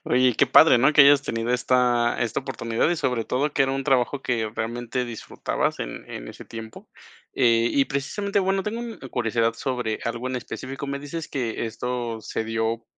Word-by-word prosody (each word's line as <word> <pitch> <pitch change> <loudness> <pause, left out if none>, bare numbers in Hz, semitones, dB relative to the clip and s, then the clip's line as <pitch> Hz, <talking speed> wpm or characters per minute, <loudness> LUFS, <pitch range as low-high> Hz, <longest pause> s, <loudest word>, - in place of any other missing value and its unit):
Oye, 125 -1 +3
qué 140 - +4
padre, 130 0 +7
¿no? 135 +5 +4
Que 150 - +8
hayas 140 0 +6
tenido 115 -1 -2
esta 125 -1 +2
esta 115 +1 -1
oportunidad 115 -1 -1
y 175 - +1
sobre 125 -6 -1
todo, 140 +7 0
que - - +3
era 135 - +1
un 135 0 -2
trabajo 135 0 +1
que 115 -3 -1
realmente 120 +2 -3
disfrutabas 120 -2 -3
en - - -6
en - - -7
ese - - -10
tiempo. 110 -1 -10 0.5
Eh, 115 -2 +3
y 140 -1 +3
precisamente 200 +9 -2
bueno, 195 0 +1
tengo 225 +4 -4 0.3
curiosidad 115 -1 +1
sobre 120 -3 -2
algo 120 +2 -3
en 130 - -2
específico. 130 +3 -6
Me 140 0 -3
dices 145 +3 -6
que 120 -4 -2
esto 120 0 -4
se 110 - -4
dio 115 +1 -2
125 Hz, 185 wpm, -24 LUFS, 115-135 Hz, 0.5 s, Que